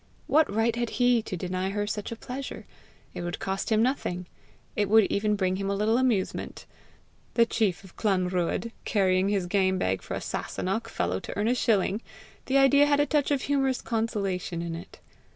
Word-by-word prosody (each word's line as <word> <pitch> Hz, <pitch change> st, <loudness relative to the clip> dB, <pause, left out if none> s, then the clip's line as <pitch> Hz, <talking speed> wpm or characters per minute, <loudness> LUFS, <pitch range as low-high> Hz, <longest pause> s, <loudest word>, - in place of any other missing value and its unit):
What 310 Hz, -4 st, +3 dB
right 225 Hz, +2 st, +1 dB
had 240 Hz, -1 st, -1 dB
he 245 Hz, -2 st, +4 dB
to 205 Hz, -4 st, -5 dB
deny 185 Hz, +2 st, -2 dB
her 205 Hz, +1 st, -1 dB
such 210 Hz, 0 st, -4 dB
a -, -, -3 dB
pleasure! 255 Hz, +4 st, -7 dB, 0.5 s
It -, -, -5 dB
would 175 Hz, 0 st, -3 dB
cost 195 Hz, +3 st, -3 dB
him 220 Hz, 0 st, +4 dB
nothing! 185 Hz, -9 st, -1 dB, 0.5 s
It 205 Hz, -2 st, +1 dB
would 220 Hz, +1 st, +7 dB
even 210 Hz, +1 st, +1 dB
bring 185 Hz, -2 st, 0 dB
him 195 Hz, 0 st, -2 dB
a 200 Hz, -, 0 dB
little 220 Hz, +4 st, +2 dB
amusement! 235 Hz, -7 st, -1 dB, 0.7 s
The 235 Hz, -, +6 dB
chief 200 Hz, -5 st, 0 dB
of 190 Hz, -, -15 dB
Clanruadh 185 Hz, +1 st, 0 dB
carrying 190 Hz, -2 st, +2 dB
his 200 Hz, -3 st, 0 dB
game 190 Hz, 0 st, +2 dB
bag 95 Hz, -, 0 dB
for -, -, -5 dB
a -, -, -2 dB
Sasunnach 195 Hz, +5 st, -3 dB
fellow 90 Hz, +2 st, -1 dB
to -, -, -7 dB
earn 205 Hz, +2 st, +1 dB
a -, -, +4 dB
shilling! 215 Hz, -3 st, +1 dB, 0.5 s
the 270 Hz, -, +3 dB
idea 280 Hz, +1 st, +6 dB
had 290 Hz, 0 st, +3 dB
a 290 Hz, -, +4 dB
touch 295 Hz, -1 st, +1 dB
of 280 Hz, -3 st, +1 dB
humorous 270 Hz, -2 st, +1 dB
consolation 200 Hz, -7 st, -2 dB
in 170 Hz, -1 st, -4 dB
it. 170 Hz, +3 st, -9 dB
210 Hz, 190 wpm, -27 LUFS, 185-235 Hz, 0.7 s, would